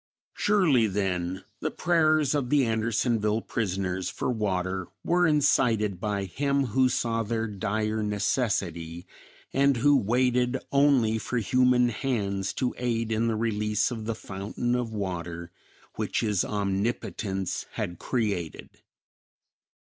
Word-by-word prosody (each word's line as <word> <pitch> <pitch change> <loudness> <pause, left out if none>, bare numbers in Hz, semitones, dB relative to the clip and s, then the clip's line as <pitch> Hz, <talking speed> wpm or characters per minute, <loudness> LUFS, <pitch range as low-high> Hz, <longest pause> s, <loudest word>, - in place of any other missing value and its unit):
Surely 165 - +3
then, 95 -2 -2 0.2
the 155 - -1
prayers 155 -4 +2
of 140 -4 -1
the 145 -2 +4
Andersonville 110 -1 +1
prisoners 95 -5 -2
for - - -2
water 95 -5 -1 0.2
were 175 0 +3
incited 115 - +2
by 100 0 -1
Him 140 +8 0
who 130 0 +4
saw 115 -2 0
their 115 +1 -1
dire 110 +1 -2
necessity, 95 - -1 0.5
and 140 -1 +3
who 145 +4 +4
waited 125 +2 +2
only 135 -6 +3
for 125 +4 -3
human 125 +2 +3
hands 105 -6 -1
to 125 -2 -1
aid 115 -2 -1
in 110 +1 +1
the 115 - 0
release 105 -1 0
of 110 -3 -5
the 115 0 -2
fountain 105 +4 -3
of 125 -2 -1
water 85 -4 -4 0.5
which - - -1
his 105 -5 +1
Omnipotence 100 -1 -2
had 85 -1 -4
created. 100 - -3
110 Hz, 125 wpm, -27 LUFS, 100-125 Hz, 0.5 s, the